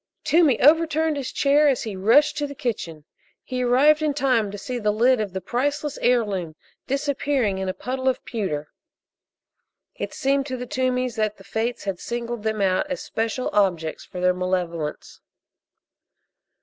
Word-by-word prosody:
Toomey 315 Hz, -7 st, +4 dB
overturned 320 Hz, +1 st, +4 dB
his 275 Hz, -3 st, -4 dB
chair 290 Hz, +2 st, +3 dB
as 270 Hz, -3 st, +1 dB
he 215 Hz, -3 st, -5 dB
rushed 230 Hz, +11 st, +4 dB
to 290 Hz, -, -1 dB
the 280 Hz, -, -9 dB
kitchen. 175 Hz, -, -4 dB, 0.4 s
He 255 Hz, -1 st, -3 dB
arrived 275 Hz, +5 st, +4 dB
in 300 Hz, -2 st, 0 dB
time 255 Hz, -7 st, +2 dB
to 205 Hz, -, -7 dB
see 245 Hz, +5 st, -4 dB
the 210 Hz, -2 st, 0 dB
lid 235 Hz, +3 st, +3 dB
of 205 Hz, -3 st, -3 dB
the 190 Hz, +1 st, -4 dB
priceless 285 Hz, -, -2 dB
heirloom 205 Hz, -10 st, 0 dB, 0.3 s
disappearing 275 Hz, -6 st, 0 dB
in 190 Hz, -1 st, -2 dB
a -, -, -1 dB
puddle 260 Hz, +5 st, -1 dB
of 260 Hz, -, -3 dB
pewter. 170 Hz, -11 st, -3 dB, 1.2 s
It -, -, -5 dB
seemed 275 Hz, +1 st, +1 dB
to 260 Hz, -2 st, -4 dB
the 250 Hz, -, -5 dB
Toomeys 255 Hz, -1 st, -1 dB
that 215 Hz, -1 st, 0 dB
the 195 Hz, -, -15 dB
Fates 225 Hz, +5 st, -3 dB
had 195 Hz, -3 st, -3 dB
singled 235 Hz, -1 st, -4 dB
them 215 Hz, -1 st, -1 dB
out 195 Hz, +10 st, +1 dB
as 275 Hz, -, -3 dB
special 225 Hz, +3 st, -2 dB
objects 175 Hz, -6 st, +1 dB
for 180 Hz, -, -9 dB
their 180 Hz, 0 st, +3 dB
malevolence. 180 Hz, -4 st, -3 dB
240 Hz, 165 wpm, -23 LUFS, 195-275 Hz, 1.2 s, Toomey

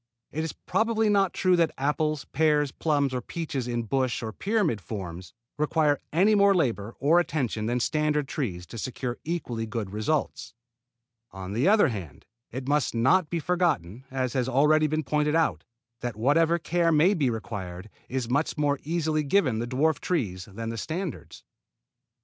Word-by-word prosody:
It 155 Hz, -, -2 dB
is 160 Hz, -, -3 dB
probably 225 Hz, -1 st, 0 dB
not 195 Hz, -3 st, +3 dB
true 185 Hz, -1 st, +2 dB
that 165 Hz, -2 st, +3 dB
apples, 150 Hz, +1 st, 0 dB
pears, 150 Hz, -1 st, +2 dB
plums 145 Hz, -3 st, 0 dB
or 125 Hz, -, -1 dB
peaches 140 Hz, -3 st, -4 dB
in 120 Hz, -1 st, -1 dB
bush 130 Hz, +1 st, -1 dB
or 110 Hz, -1 st, -4 dB
pyramid 195 Hz, -, 0 dB
forms 90 Hz, -5 st, -7 dB, 0.3 s
require 150 Hz, -1 st, +2 dB
any 190 Hz, +7 st, +4 dB
more 200 Hz, -1 st, +5 dB
labor 115 Hz, -, -1 dB
or 155 Hz, +6 st, +4 dB
attention 125 Hz, -10 st, -1 dB
than 120 Hz, +1 st, 0 dB
standard 150 Hz, +2 st, 0 dB
trees 95 Hz, -, -3 dB
to 115 Hz, -, -8 dB
secure 125 Hz, 0 st, -4 dB
equally 125 Hz, -9 st, -3 dB
good 110 Hz, -3 st, -4 dB
results. 115 Hz, +3 st, -2 dB, 0.7 s
On 95 Hz, 0 st, -7 dB
the 120 Hz, -, +1 dB
other 210 Hz, -4 st, +5 dB
hand 90 Hz, -, -7 dB, 0.2 s
it 130 Hz, +2 st, -6 dB
must 145 Hz, -4 st, +1 dB
not 150 Hz, +9 st, +3 dB
be 170 Hz, -, -1 dB
forgotten, 155 Hz, -, 0 dB
as 130 Hz, -2 st, -2 dB
has 130 Hz, -1 st, 0 dB
already 150 Hz, +4 st, +4 dB
been 155 Hz, +1 st, -1 dB
pointed 150 Hz, +2 st, +1 dB
out, 165 Hz, -1 st, +1 dB, 0.3 s
that 120 Hz, -2 st, -4 dB
whatever 160 Hz, +8 st, +3 dB
care 170 Hz, 0 st, +1 dB
may 165 Hz, +6 st, +5 dB
be 145 Hz, -9 st, +1 dB
required 100 Hz, -5 st, -5 dB, 0.2 s
is 130 Hz, -2 st, -2 dB
much 140 Hz, +7 st, 0 dB
more 145 Hz, -1 st, +1 dB
easily 155 Hz, -1 st, 0 dB
given 140 Hz, -, +2 dB
the 120 Hz, -, -2 dB
dwarf 145 Hz, +5 st, +1 dB
trees 95 Hz, -, -2 dB
than 115 Hz, +3 st, -5 dB
the 115 Hz, -1 st, -4 dB
standards. 155 Hz, -, -5 dB
140 Hz, 165 wpm, -27 LUFS, 115-160 Hz, 0.7 s, more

